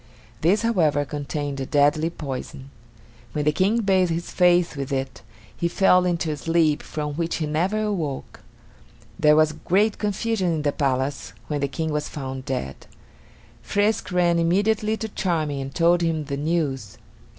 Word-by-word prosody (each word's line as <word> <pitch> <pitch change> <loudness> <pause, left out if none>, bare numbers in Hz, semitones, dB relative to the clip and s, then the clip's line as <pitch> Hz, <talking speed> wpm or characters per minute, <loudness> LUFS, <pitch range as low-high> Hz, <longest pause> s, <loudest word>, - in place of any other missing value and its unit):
This, 195 +8 +3
however, 160 -11 +2
contained 145 -1 -4
a 135 - -2
deadly 145 +2 +3
poison. 135 -3 -7 0.6
When 150 -1 -1
the 150 - +4
King 195 +8 +2
bathed 190 -3 +3
his 170 +1 -3
face 175 -2 +3
with 140 0 -5
it, 135 -1 -3 0.3
he 170 - -1
fell 180 +1 +4
into 170 -2 -1
a 150 - -3
sleep 165 -1 +2
from 150 -1 -4
which 165 +2 -2
he 160 - -2
never 180 +8 0
awoke. 165 -10 -3 0.8
There 150 0 +5
was 155 0 +4
great 200 +7 +1
confusion 210 -2 0
in 155 - -1
the 145 - +2
palace 135 0 -1 0.2
when 145 -2 -1
the 140 - +1
King 155 +4 -3
was 150 0 -2
found 130 -2 -6
dead. 100 - -4 0.7
Frisk 205 0 0
ran 175 -1 +2
immediately 210 +6 +1
to 220 - -4
Charming 160 -9 -1
and 135 0 -7
told 170 +1 +3
him 165 -2 0
the 140 -1 -4
news. 145 - -2
160 Hz, 160 wpm, -23 LUFS, 145-180 Hz, 0.8 s, There